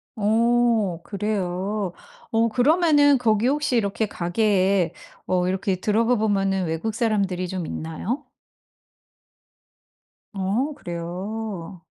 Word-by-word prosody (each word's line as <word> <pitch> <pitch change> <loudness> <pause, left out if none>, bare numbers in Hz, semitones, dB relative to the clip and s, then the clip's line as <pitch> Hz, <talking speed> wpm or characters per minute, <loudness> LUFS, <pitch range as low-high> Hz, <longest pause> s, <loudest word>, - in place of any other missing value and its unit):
오 225 -3 +2
그래요? 200 -2 -2 0.4
어 230 +1 +3
그러면은 290 +2 +4
거기 225 -2 +2
혹시 290 -2 +1
이렇게 215 0 0
가게에 190 -2 +1 0.3
어 180 -1 +1
이렇게 190 +1 0
들어가 225 +5 +2
보면은 195 -3 +1
외국 165 +7 -2
사람들이 200 -6 0
좀 180 -2 -4
있나요? 190 - -4 2.1
어 205 +10 -1
그래요? 180 +1 -6
205 Hz, 215 characters per minute, -23 LUFS, 185-230 Hz, 2.1 s, 그러면은